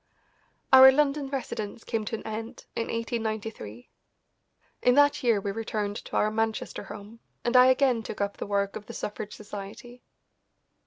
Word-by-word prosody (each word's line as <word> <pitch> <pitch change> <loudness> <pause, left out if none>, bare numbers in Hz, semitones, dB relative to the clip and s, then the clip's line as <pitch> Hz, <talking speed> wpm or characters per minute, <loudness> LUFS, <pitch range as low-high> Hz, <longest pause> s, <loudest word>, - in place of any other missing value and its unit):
Our 265 0 +11
London 280 0 +1
residence 230 -5 -5
came 225 -2 -2
to 225 - -3
an - - -8
end 220 +1 -6
in 230 - -2
1893. 220 - -4 0.9
In 250 - +4
that 290 0 +4
year 235 -5 +3
we 200 0 -3
returned 210 -1 -3
to - - -8
our 215 - +2
Manchester 225 0 -2
home, 210 +2 -10 0.2
and 240 +1 -1
I 250 0 +8
again 260 -2 +3
took 215 - -7
up 200 0 -2
the - - -5
work 200 -1 0
of 210 - -8
the - - -8
Suffrage 210 0 -5
Society. 215 +4 -9
225 Hz, 160 wpm, -27 LUFS, 205-250 Hz, 0.9 s, Our